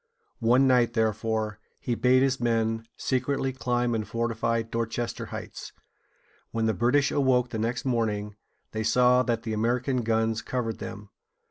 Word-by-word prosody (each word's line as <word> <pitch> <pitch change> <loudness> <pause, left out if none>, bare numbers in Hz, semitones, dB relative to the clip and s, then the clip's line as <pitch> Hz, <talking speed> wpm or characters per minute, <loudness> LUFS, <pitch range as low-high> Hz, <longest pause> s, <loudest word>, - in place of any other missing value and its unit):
One 125 +4 +4
night, 125 -3 +3
therefore, 110 -1 -1 0.2
he 125 - -2
bade 130 +2 +4
his 135 -1 +1
men 115 -1 0
secretly 130 +1 -1
climb 120 -1 0
and 110 -3 -2
fortify 115 0 -1
Dor´ches 115 +1 -3
ter - - -6
Heights. - - -8 0.8
When 115 -1 -1
the 110 - +2
British 125 +7 +2
awoke 130 -3 +2
the 110 - -3
next 120 +4 -2
morning, 105 -4 -1 0.4
they 110 - -3
saw 125 +3 +4
that 120 -3 -1
the 110 -1 -3
American 125 +4 0
guns 110 0 0
covered 115 -3 -3
them. 105 -2 -8
115 Hz, 150 wpm, -27 LUFS, 110-125 Hz, 0.8 s, One